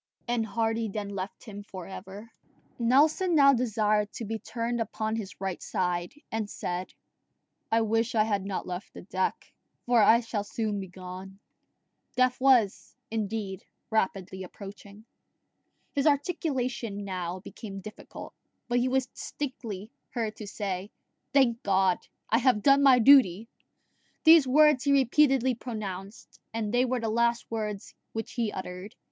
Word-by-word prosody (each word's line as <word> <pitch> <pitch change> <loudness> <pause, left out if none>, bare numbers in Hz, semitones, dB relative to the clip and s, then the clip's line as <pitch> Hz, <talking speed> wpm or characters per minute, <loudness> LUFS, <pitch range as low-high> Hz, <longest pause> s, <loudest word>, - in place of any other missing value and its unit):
And 235 -2 0
Hardy 225 0 -1
then 205 0 -4
left 195 0 -6
him 205 -2 -8
for 190 -3 -9
ever. 195 +4 -9 0.5
Nelson 305 +9 +3
now 275 -2 +7
desired 215 -4 +1
to 230 - -5
be 220 +1 -3
turned 235 +2 -3
upon 220 0 -2
his 205 -4 -6
right 190 -2 -3
side, 175 +3 -2 0.2
and 220 -2 -2
said, 180 -1 -4 0.8
"I 225 0 +4
wish 225 +1 0
I 215 - +5
had 205 -3 0
not 195 -1 -3
left 180 +1 -6
the - - -9
deck, 185 0 -2 0.3
for 240 -2 +4
I 225 +3 +6
shall 220 -3 -3
soon 210 0 -2
be 190 - -5
gone." 185 +1 -9 0.8
Death 255 0 +2
was, 245 -7 +3 0.2
indeed, 210 -3 -3 0.3
rapidly 190 -3 -1
approaching. 200 +2 -11 0.9
His 280 +1 +1
articulation 260 - -1
now 185 -1 -4
became 200 0 -8
difficult, 215 +3 -10 0.3
but 245 0 +2
he 245 - +1
was 260 0 +1
distinctly 230 -8 -6 0.2
heard 220 -3 -2
to 215 - -7
say, 195 -1 -4 0.4
"Thank 250 -5 +3
God, 190 -2 +2 0.3
I 225 - +3
have 245 -5 +3
done 275 0 +6
my 270 -2 +7
duty!" 230 -5 +6 0.7
These 320 -4 +8
words 300 0 +5
he 280 - +3
repeatedly 265 -1 +4
pronounced, 210 -4 -7 0.2
and 220 -1 -2
they 245 +1 +4
were 255 0 0
the 225 - -2
last 235 +1 +1
words 210 -3 -4 0.2
which 225 -1 -4
he 230 -4 -1
uttered. 185 +4 -7
220 Hz, 145 wpm, -28 LUFS, 195-245 Hz, 0.9 s, These